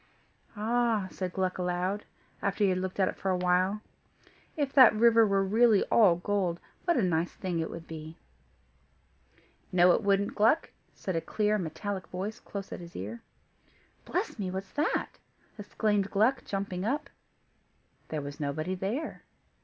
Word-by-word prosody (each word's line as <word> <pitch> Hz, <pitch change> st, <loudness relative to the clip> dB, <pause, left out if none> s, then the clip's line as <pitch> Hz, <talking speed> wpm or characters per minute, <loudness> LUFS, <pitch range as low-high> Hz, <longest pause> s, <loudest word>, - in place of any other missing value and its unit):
"Ah!" 225 Hz, -1 st, +1 dB
said 185 Hz, -2 st, -4 dB
Gluck 185 Hz, 0 st, -1 dB
aloud, 180 Hz, +3 st, -1 dB, 0.4 s
after 200 Hz, +1 st, 0 dB
he 195 Hz, -, +4 dB
had 185 Hz, -, 0 dB
looked 185 Hz, +1 st, -4 dB
at 190 Hz, -, +4 dB
it -, -, -3 dB
for 195 Hz, -, -2 dB
a 185 Hz, -, +2 dB
while, 180 Hz, +3 st, +1 dB, 0.8 s
"if 285 Hz, -3 st, -1 dB
that 255 Hz, -6 st, +8 dB
river 230 Hz, 0 st, +5 dB
were 195 Hz, -1 st, +2 dB
really 215 Hz, +1 st, +4 dB
all 200 Hz, -7 st, +6 dB
gold, 180 Hz, -1 st, -1 dB, 0.3 s
what 345 Hz, -2 st, +2 dB
a 235 Hz, -, +2 dB
nice 170 Hz, -1 st, 0 dB
thing 180 Hz, -3 st, -3 dB
it 160 Hz, -, -2 dB
would 165 Hz, 0 st, -8 dB
be." 160 Hz, 0 st, -9 dB, 1.5 s
"No 180 Hz, 0 st, +6 dB
it -, -, +2 dB
wouldn't, 200 Hz, -1 st, +1 dB
Gluck," 225 Hz, +10 st, +3 dB, 0.2 s
said 185 Hz, -, -4 dB
a 165 Hz, -, 0 dB
clear, 210 Hz, +2 st, 0 dB
metallic 185 Hz, +3 st, -4 dB
voice 195 Hz, +4 st, -5 dB
close 200 Hz, -1 st, -7 dB
at -, -, -6 dB
his 170 Hz, -1 st, -11 dB
ear. 105 Hz, +5 st, -6 dB, 0.8 s
"Bless -, -, -3 dB
me! 190 Hz, -2 st, -2 dB
what's 190 Hz, +1 st, -5 dB
that?" 295 Hz, +2 st, -1 dB, 0.4 s
exclaimed 205 Hz, -1 st, 0 dB
Gluck, 235 Hz, +6 st, +2 dB
jumping 195 Hz, -2 st, -3 dB
up. 280 Hz, +7 st, -1 dB, 1.0 s
There 155 Hz, -2 st, -3 dB
was 145 Hz, +1 st, -7 dB
nobody 155 Hz, +5 st, -2 dB
there. 200 Hz, -, -3 dB
195 Hz, 160 wpm, -29 LUFS, 180-215 Hz, 1.5 s, that